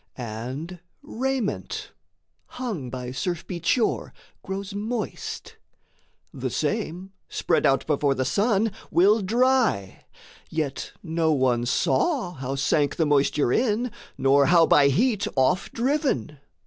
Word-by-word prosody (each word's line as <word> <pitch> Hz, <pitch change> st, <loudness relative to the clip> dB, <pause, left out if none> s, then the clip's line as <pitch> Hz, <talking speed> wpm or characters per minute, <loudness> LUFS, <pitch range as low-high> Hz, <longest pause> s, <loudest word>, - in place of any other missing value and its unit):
And 130 Hz, +9 st, -6 dB, 0.2 s
raiment, 265 Hz, -5 st, -3 dB, 0.7 s
hung 210 Hz, -, -4 dB
by 125 Hz, 0 st, -5 dB
surf 175 Hz, +5 st, -3 dB
beat 170 Hz, -2 st, -6 dB
shore, 240 Hz, -3 st, +1 dB, 0.3 s
grows 195 Hz, 0 st, -5 dB
moist, 220 Hz, +3 st, -4 dB, 0.8 s
The -, -, -3 dB
same, 190 Hz, -3 st, -2 dB, 0.2 s
spread 165 Hz, -, +1 dB
out 135 Hz, 0 st, +2 dB
before 145 Hz, -2 st, +1 dB
the 130 Hz, -, -1 dB
sun, 205 Hz, -, +2 dB, 0.2 s
will 205 Hz, +5 st, +4 dB
dry; 235 Hz, -, +1 dB, 0.4 s
Yet 155 Hz, -4 st, -3 dB
no 165 Hz, -2 st, +1 dB
one 125 Hz, -3 st, +1 dB
saw 180 Hz, -, +1 dB
how 135 Hz, -2 st, -4 dB
sank 145 Hz, +1 st, +1 dB
the 160 Hz, -, +1 dB
moisture 145 Hz, -2 st, +2 dB
in, 235 Hz, 0 st, +1 dB, 0.3 s
Nor 140 Hz, +1 st, +4 dB
how 170 Hz, -1 st, +6 dB
by 145 Hz, -3 st, +5 dB
heat 205 Hz, -, +2 dB
off 180 Hz, +9 st, +2 dB
driven. 235 Hz, -, -1 dB
170 Hz, 120 wpm, -25 LUFS, 135-220 Hz, 0.8 s, how